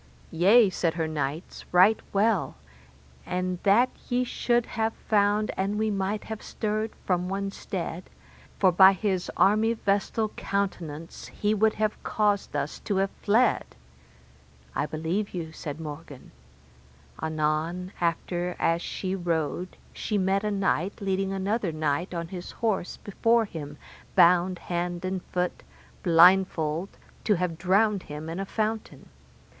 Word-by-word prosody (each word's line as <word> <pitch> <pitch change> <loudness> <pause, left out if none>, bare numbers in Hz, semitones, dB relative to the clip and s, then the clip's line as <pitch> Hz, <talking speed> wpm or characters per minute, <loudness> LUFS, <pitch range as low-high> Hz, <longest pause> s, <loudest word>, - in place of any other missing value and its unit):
Yea, 205 +7 +6
said 170 -3 -1
her 165 -2 -1
knights, 150 +1 -4
right 185 +5 +6
well, 205 -2 +1 0.7
and 180 0 -2
that 215 +6 +5 0.2
ye 250 +1 +2
should 240 -1 0
have 225 0 -2
found 210 0 +2
an 195 +2 -1
we 215 0 +1
might 200 +1 -2
have 220 -1 -6
stirred 215 +1 -2 0.2
from 180 -1 0
one 195 0 -2
stead, 180 -2 -5 0.5
for 190 -2 +4
by 190 +2 +8
his 190 -2 -1
armyvestal 215 0 +2
countenance 165 -6 -4
he 210 +1 -1
would 215 +1 +3
have 215 0 -1
caused 205 -2 0
us - - -2
to 205 - -2
have 195 +1 +1
fled. 225 +4 +3 1.1
I 150 - -1
believe 170 +7 -2
you, 165 -2 -4
said 155 -1 -7
Morgan. 150 -3 -9 0.9
Anon 160 +3 -1
after 175 +1 -1
as 165 +1 +1
she 185 +1 -3
rode 175 -1 -2 0.2
she 210 - -2
met 195 +1 +1
a 210 - 0
knight 195 -2 0
leading 195 -1 -1
another 195 0 -1
knight 155 +3 -1
on 170 -2 -4
his 180 -1 -7
horse 215 -6 -1
before 230 +3 +1
him, 150 -6 -8 0.4
bound 180 +1 +5
hand 175 0 -3
and 185 0 -2
foot, 180 0 -2 0.4
blindfold, 170 -1 +4 0.4
to 210 - +4
have 170 -2 -2
drowned 200 +2 +3
him 150 +2 -6
in 165 +3 -4
a 195 - -2
fountain. 220 +1 -3
190 Hz, 135 wpm, -27 LUFS, 170-210 Hz, 1.1 s, by